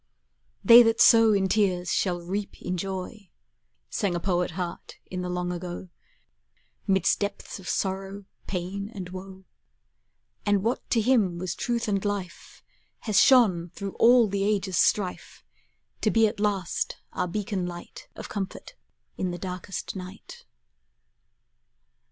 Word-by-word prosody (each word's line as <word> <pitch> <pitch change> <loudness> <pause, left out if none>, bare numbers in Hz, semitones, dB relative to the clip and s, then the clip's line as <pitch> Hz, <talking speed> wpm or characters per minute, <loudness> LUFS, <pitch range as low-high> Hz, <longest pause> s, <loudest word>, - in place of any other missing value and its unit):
"They 235 0 +10
that 225 -1 +2
sow 225 -1 +7
in 195 -2 +2
tears 185 -4 +1
Shall 175 -2 0
reap 195 +3 -4
in 180 - -3
joy," 190 +2 -5 0.6
Sang 195 -5 -1
a - - -1
poet 180 -1 0
heart 175 -2 -5 0.2
in 185 -1 -3
the 180 - -4
long 180 0 -2
ago, 180 +1 -6 1.0
'Midst 190 -1 +2
depths 205 0 -4
of 185 - -8
sorrow, 195 +1 -3 0.2
pain, 195 +2 -4
and 185 -3 -6
woe; 190 +1 -9 1.0
And 205 -2 +2
what 235 +3 -2
to 230 - +2
him 210 -7 +2
was 180 0 -3
truth 235 -2 -2
and 200 -2 0
life 200 -4 -5 0.4
Has 215 -2 +3
shone 195 -10 +5
through 200 -1 -5
all 240 -1 +6
the 200 0 -1
ages' 195 -3 0
strife, 190 -4 0 0.6
To 215 - +2
be 225 +1 +4
at 215 0 -2
last 200 -4 -1 0.2
our 180 - -1
beacon 195 0 -3
light 175 0 -9
Of - - -7
comfort 200 - -6 0.5
in 185 - 0
the 175 - -4
darkest 185 +2 -6
night. 195 - -10
195 Hz, 140 wpm, -26 LUFS, 180-210 Hz, 1.0 s, They